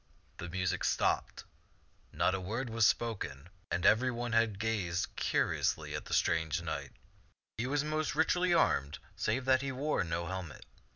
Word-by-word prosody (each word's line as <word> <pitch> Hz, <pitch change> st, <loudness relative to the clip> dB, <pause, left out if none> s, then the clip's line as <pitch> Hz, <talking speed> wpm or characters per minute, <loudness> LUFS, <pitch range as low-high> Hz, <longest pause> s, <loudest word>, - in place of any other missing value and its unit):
The 85 Hz, -, -6 dB
music 90 Hz, 0 st, -1 dB
stopped, -, -, 0 dB, 0.7 s
not 95 Hz, -, +1 dB
a 95 Hz, -, -2 dB
word 115 Hz, +6 st, -3 dB
was 115 Hz, -1 st, +4 dB
spoken, 95 Hz, -10 st, -2 dB, 0.2 s
and 90 Hz, -, -1 dB
every 115 Hz, +4 st, +5 dB
one 120 Hz, 0 st, -3 dB, 0.3 s
gazed 100 Hz, -5 st, -1 dB
curiously -, -, 0 dB
at -, -, -4 dB
the -, -, -5 dB
strange 80 Hz, 0 st, +1 dB
knight. 75 Hz, -5 st, -5 dB, 0.7 s
He 120 Hz, -, 0 dB
was 145 Hz, +2 st, +1 dB
most 155 Hz, 0 st, -1 dB
richly 175 Hz, +3 st, +2 dB
armed 70 Hz, -, +2 dB, 0.2 s
save 125 Hz, +4 st, -1 dB
that 130 Hz, -1 st, +4 dB
he 135 Hz, -1 st, -2 dB
wore 140 Hz, -2 st, 0 dB
no 85 Hz, 0 st, -2 dB
helmet. 90 Hz, -6 st, -6 dB
105 Hz, 155 wpm, -32 LUFS, 85-130 Hz, 0.7 s, every